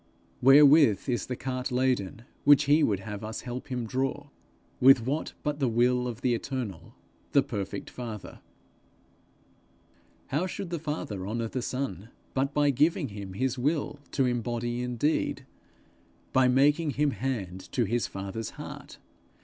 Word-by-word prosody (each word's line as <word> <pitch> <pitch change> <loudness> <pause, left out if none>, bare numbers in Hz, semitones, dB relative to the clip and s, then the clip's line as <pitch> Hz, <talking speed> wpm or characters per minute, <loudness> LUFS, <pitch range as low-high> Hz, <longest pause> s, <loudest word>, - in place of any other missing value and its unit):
Wherewith 140 -3 +6
is 125 -2 -1
the 125 - -3
cart 130 +1 -4
laden 125 -5 0 0.2
which 145 0 +7
he 150 +2 +4
would 100 -9 +1
have 105 +1 -7
us 110 0 -5
help 125 +1 -6
him 125 -4 -3
draw? 135 +4 -2 0.5
With 130 -2 +6
what 145 +5 -2
but 150 -1 -2
the 135 - +2
will 125 +2 +2
of 120 0 -6
the 125 -1 +2
eternal, 120 -7 -5 0.4
the 140 - +5
perfect 100 -6 -5
Father? 115 -5 -7 1.9
How 155 +7 0
should 190 -1 -6
the 170 - -2
Father 130 - -4
honour 115 +1 -2
the 130 - -3
Son, 115 - -4 0.2
but 135 +1 0
by 145 0 +3
giving 150 +3 +2
him 100 -2 -7
his 130 +5 -1
will 145 +2 -1
to 135 - +2
embody 120 0 -2
in 125 -1 -3
deed, 150 +7 0 0.9
by 130 -1 +5
making 145 +4 +3
him 150 -1 +3
hand 100 -10 -4
to 125 - +1
his 115 +3 0
father's 100 +3 -5
heart! - - -9
125 Hz, 150 wpm, -28 LUFS, 115-140 Hz, 1.9 s, which